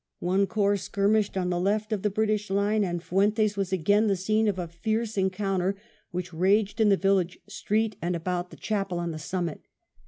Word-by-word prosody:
One 190 +3 +1
corps 205 -1 +1
skirmished 200 +1 +1
on 180 -1 0
the 175 - 0
left 210 +3 0
of 205 - -2
the 210 - +1
British 215 0 0
line, 205 +2 +2
and 175 -2 -2
Fuentes 205 +3 +2
was 195 -2 -2
again 205 +4 +3
the 200 - +2
scene 215 +4 +1
of 200 -3 0
a 175 -2 -3
fiercer 215 +6 -2
encounter, 190 0 0 0.3
which 180 -1 -5
raged 200 +5 +2
in 215 - +5
the 195 - +4
village 190 -2 +1
street 215 0 -1
and 175 +1 -1
about 175 +1 -2
the - - -13
chapel 195 -4 -2
on 170 -1 -2
the 155 - -6
summit. 170 0 -3
195 Hz, 195 wpm, -27 LUFS, 180-210 Hz, 0.3 s, in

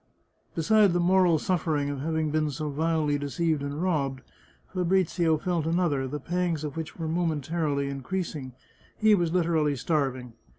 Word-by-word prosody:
Besides 200 +3 +4
the 175 - +2
moral 180 -1 +4
suffering 155 -4 0
of 140 - -4
having 160 +1 -1
been 155 0 +1
so 150 +1 -4
vilely 155 -1 0
deceived 155 +2 -1
and 145 +4 -3
robbed, 140 -7 0 0.5
Fabrizio 180 -3 +2
felt 170 -1 -1
another, 165 -6 +1
the 150 +3 -4
pangs 170 0 -1
of 150 -2 -4
which 160 -1 -6
were 165 -2 -3
momentarily 155 -3 -1
increasing 140 -1 -4 0.2
— - - -30
he 215 0 +5
was 175 -5 +2
literally 165 -4 +2
starv 135 -1 0
ing. 125 -2 -11
160 Hz, 160 wpm, -27 LUFS, 145-175 Hz, 0.5 s, he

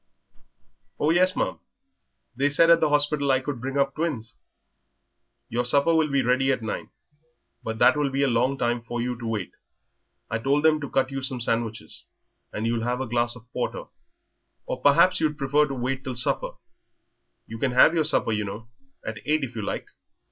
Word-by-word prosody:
"Oh, 150 - +2
yes, 185 +2 +3
ma'am; - - -2 0.8
they 140 +3 +1
said 165 +4 +5
at 165 - +6
the - - +2
hospital 145 -1 +1
I 130 - +3
could 130 -2 -5
bring 135 +2 -3
up 140 0 +1
twins." 135 -9 -3 1.1
"Your 120 +2 -1
supper 140 +6 +3
will 160 -1 +3
be 140 -1 +1
ready 130 +2 +2
at 125 -3 -2
nine. 110 - -4 0.7
But 110 0 -5
that - - +5
will 145 -2 0
be 135 +1 0
a - - +3
long 125 +3 +1
time 120 -1 0
for 120 +1 -5
you 125 +1 -2
to 115 - -5
wait. 105 -5 -3 0.8
I 110 - -2
told 140 +5 +1
them 155 -1 +3
to 140 - -5
cut 135 0 0
you 135 0 -4
some 130 -1 -3
sandwiches, 115 -1 -3 0.5
and 110 - -4
you'll 115 0 -1
have 125 +1 -1
a 130 - -2
glass 120 0 +1
of 125 - -13
porter. 125 - -3 0.8
Or 125 - -5
perhaps 180 +7 +4
you'd 155 -2 0
prefer 145 +2 +2
to 135 - -5
wait 130 +2 -3
till 130 -2 -5
supper? - - 0 0.9
You 115 0 -9
can 130 -1 0
have 130 +6 +6
your 165 -2 +2
supper, 150 -6 +1
you 105 -1 -1
know, 105 +3 -7 0.4
at 110 -1 -5
eight, 155 0 +1
if 125 -2 -5
you 110 - -3
like?" 100 - -4
130 Hz, 195 wpm, -25 LUFS, 120-145 Hz, 1.1 s, at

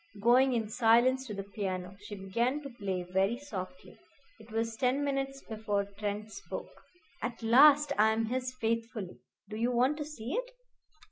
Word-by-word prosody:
Going 250 +4 +5
in 225 -3 0
silence 245 +4 +3
to 210 - -5
the 195 - -4
piano, 190 -2 -4
she 205 +1 -8
began 235 +9 -1
to 275 - -7
play 195 -6 -3
very 195 +5 +2
softly. 235 -4 -8 0.4
It 220 +1 -15
was 225 0 -1
ten 255 +4 +1
minutes 275 -1 -2
before 215 -2 -2
Trent 210 +1 -3
spoke. 400 - -8 0.4
"At 235 -1 -4
last 285 +5 +6
I 215 +1 +6
am 225 +1 +1
his 255 +2 -2
faithfully. 230 -5 -3 0.3
Do 215 +1 -6
you 235 +2 +1
want 255 +5 +2
to 295 - -3
see 260 -4 -6
it?" - - -2
230 Hz, 165 wpm, -31 LUFS, 210-260 Hz, 0.4 s, last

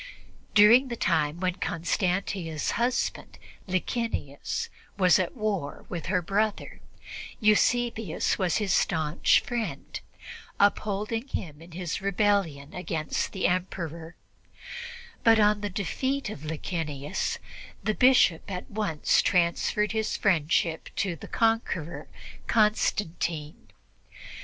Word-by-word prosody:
During 230 +6 +7
the 240 - -4
time 155 -6 +1
when 185 0 0
Constantia's 175 -2 -1
husband, 240 +1 -1 0.3
Licinius, 185 - -2 0.3
was 185 -2 +5
at 185 +6 -2
war 200 -10 -2
with 170 -3 -5
her 180 -1 +1
brother, 205 +4 -1 0.6
Eusebius 225 -2 +2
was 185 -3 +1
his 205 -4 0
staunch 160 -1 +3
friend, 240 -2 -4 0.6
upholding 210 +4 +1
him 160 - -5
in 165 0 -13
his 175 -1 -4
rebellion 195 -7 0
against 165 -4 -2
the 190 - -2
Emperor; 170 -2 -2 1.1
but 225 -1 +6
on 210 0 +4
the 205 - -2
defeat 260 +6 -2
of 155 -7 -8
Licinius, 150 -2 -3 0.5
the 215 - +1
Bishop 250 -9 +4
at 185 -2 -6
once 200 -8 +1
transferred 180 +3 +1
his 220 -1 -1
friendship 165 -3 +1
to 190 -5 -1
the - - -10
conqueror, 225 -8 0 0.4
Constantine. 175 -8 0
185 Hz, 105 wpm, -27 LUFS, 165-215 Hz, 1.1 s, During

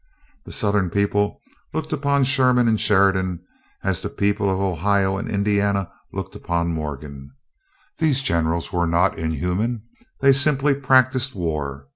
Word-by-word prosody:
The - - -10
Southern 100 -3 0
people 100 +2 0 0.4
look 160 0 -3
upon 140 -2 +1
Sherman 125 -2 +3
and 110 -2 +2
Sheridan 95 -3 +2 0.4
as - - -1
the - - -4
people 100 0 0
of 95 - -1
Ohio 95 +1 +1
and 100 - -4
Indiana 100 -1 0 0.2
look - - -6
upon 85 0 -2
Morgan. 70 -3 -6 0.7
These 145 -4 +2
generals 85 -1 -1
were 85 -1 +1
not 85 +2 +1
inhuman; 90 - -2 0.4
they 140 0 +5
simply 140 0 +3
practised 130 -1 +2
war. 70 -6 -4
100 Hz, 135 wpm, -22 LUFS, 85-125 Hz, 0.7 s, they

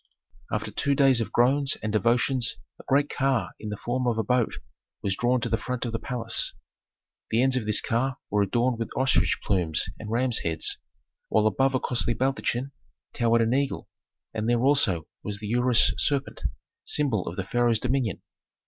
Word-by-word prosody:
After - - -2
two 140 0 0
days 135 -4 +4
of 115 - -3
groans 135 +3 +3
and 110 -1 -2
devotions 120 +3 +1 0.2
a - - -12
great 140 +1 +3
car 130 -10 0
in 105 - -6
the 105 - -4
form 125 +3 -2
of 115 -2 +1
a 110 - +1
boat 125 +1 +1 0.5
was 95 -1 0
drawn 125 +3 +1
to 120 - -1
the 115 0 0
front 125 -1 -3
of 120 - -3
the 115 - -2
palace. 125 -3 -1 0.7
The 115 +3 +2
ends 130 -1 +2
of 120 -4 -2
this 105 - +3
car 130 +4 -1
were 105 0 +2
adorned 120 +4 +1
with 115 - -3
ostrich 130 +1 +2
plumes 90 -6 0
and 105 - -7
rams' 120 +1 +1
heads, 80 -1 0 0.5
while 110 -1 +3
above 135 +5 +2
a - - +2
costly 120 -1 0
baldachin 135 +1 -1 0.4
towered 115 0 +2
an 115 +1 +2
eagle, 140 +1 -1 0.4
and 110 +1 -2
there 120 0 +2
also 120 - +3 0.2
was 105 -1 -5
the 105 0 -6
ureus 125 -1 +4
serpent, 140 -1 0 0.4
symbol 130 -10 0
of 85 - -4
the 95 - -3
pharaoh's 120 +2 +2
dominion. 125 -4 -1
120 Hz, 185 wpm, -26 LUFS, 110-130 Hz, 0.7 s, days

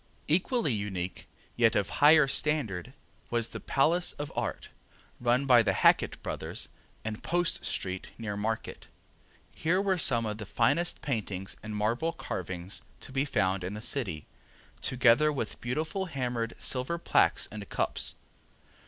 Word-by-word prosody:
Equally 185 - +2
unique, 95 -4 -4 0.3
yet 115 -1 +4
of 100 - +1
higher 150 0 +8
standard, 130 - -1 0.4
was 120 -2 +1
the - - -7
Palace 165 +6 +2
of 145 0 -6
Art, - - -3 0.5
run 125 +3 +2
by 125 -3 +7
the - - +1
Hackett - - +3
brothers, - - -4 0.4
in 110 -1 -4
Post 175 0 0
street 95 -1 -3
near 110 -3 -4
Market. 110 +2 -3 0.6
Here 170 +4 +1
were 195 -2 +1
some 120 -7 +4
of 105 0 -4
the 105 - -5
finest 165 +12 +1
paintings 100 -8 -3
and 105 0 -6
marble 115 +10 0
carvings 90 +1 -4 0.2
to - - -8
be 135 +1 +1
found 95 -9 0
in 95 +3 -4
the - - -5
city, 105 - -1 0.6
together 130 +4 +4
with 130 -7 -4
beautiful 160 +10 -2
hammered 125 -6 -2
silver 130 +6 -1
plaques 170 - +3
and 105 -2 -8
cups. - - 0
120 Hz, 145 wpm, -29 LUFS, 105-150 Hz, 0.6 s, higher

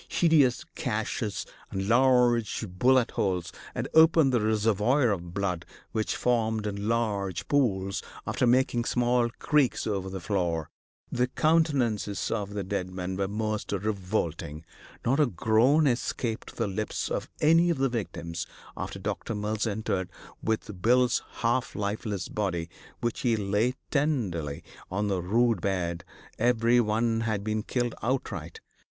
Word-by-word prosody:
Hideous 150 -7 +3
gashes - - -2 0.2
and 95 0 -3
large 120 -2 +3
bullet 125 +7 +3
holes 90 -3 -1 0.2
had - - -2
opened 160 -4 +6
the 120 - +3
reservoir 110 +4 +2
of 90 -3 -3
blood 90 -4 -1 0.3
which 110 -1 -1
formed 110 -3 +1
in 100 0 -3
large 105 -6 -1
pools, 100 -9 +1 0.2
after 125 - +1
making 120 -1 +3
small 120 -1 +2
creeks 150 -4 +2
over 95 -3 -2
the 95 0 -5
floor. 85 -3 -1 0.4
The 125 +1 +1
countenances 130 - +1
of 105 -2 -2
the 100 - -2
dead 95 -1 -2
men 90 0 -4
were 95 0 -1
most 110 +1 -2
revolting. 90 -6 -2 0.4
Not 135 +5 +2
a 150 - +5
groan 120 - +3
escaped 120 -2 -1
the 115 - 0
lips 105 +2 -3
of - - -2
any 165 +3 +5
of 170 - +1
the 135 +1 +2
victims 85 -7 -4 0.3
after - - -5
Doc. - - -4
Mills 105 0 -1
entered 100 -4 -2 0.3
with 105 -4 -2
Bill's 125 +2 +3 0.2
half 120 +2 +1
lifeless 105 -1 -2
body, 85 -5 -2 0.3
which 120 -1 -1
he 120 -2 +2
lay 105 +5 +1 0.2
tenderly 105 - -1 0.3
on 105 +2 -1
the 95 -2 0
rude 115 +2 +2
bed; 85 -3 -1 0.4
every 120 +1 +4
one 115 0 +1
had 110 -3 -1
been 110 0 -1
killed 120 +1 -1
outright. 110 - -3
110 Hz, 140 wpm, -28 LUFS, 95-120 Hz, 0.4 s, opened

